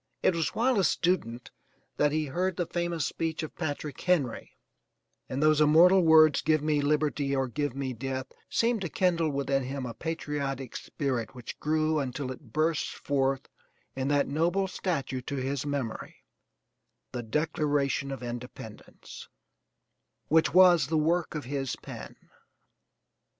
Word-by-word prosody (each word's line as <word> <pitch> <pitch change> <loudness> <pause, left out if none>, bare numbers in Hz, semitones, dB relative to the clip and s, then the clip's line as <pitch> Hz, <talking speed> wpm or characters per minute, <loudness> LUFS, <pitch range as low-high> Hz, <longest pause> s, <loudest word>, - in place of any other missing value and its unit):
It - - +4
was 165 -1 -1
while 245 -1 +2
a - - +3
student 125 -12 0 0.5
that 150 0 +3
he 155 0 0
heard 180 +6 -1
the 175 - 0
famous 170 -2 -2
speech 160 -1 -2
of 155 - -6
Patrick 150 -3 -4
Henry; 155 -10 0 0.7
and 135 +3 -1
those 155 0 +4
immortal 170 +5 +6
words, 160 -3 +6
"GIVE 155 -1 +2
ME 150 -1 +2
LIBERTY 145 -1 +1
OR 135 -1 0
GIVE 145 +1 -3
ME 135 -2 -3
DEATH," 130 +2 -4 0.2
seemed 230 -2 +1
to 180 - -3
kindle 170 -3 +1
within 140 -1 0
him 135 +1 -4
a 120 - -5
patriotic 140 -5 -4
spirit 130 -5 -3
which 125 -2 -8
grew 155 0 +1
until 130 -1 -3
it 130 -2 -11
burst 155 +3 +1
forth 135 -1 -1 0.5
in 130 0 -2
that 145 0 +2
noble 170 +6 +1
statue 150 -9 -2
to 140 +3 -5
his 135 +1 -2
memory, 140 -6 -4 0.9
the 125 - -4
Declaration 145 +1 0
of 135 -2 -6
Independence, 120 -2 -9 1.0
which 160 -2 +4
was 175 -4 +6
the 160 +1 0
work 165 +2 +1
of 150 - -4
his 135 0 -2
pen. - - -9
145 Hz, 145 wpm, -28 LUFS, 135-160 Hz, 1.0 s, immortal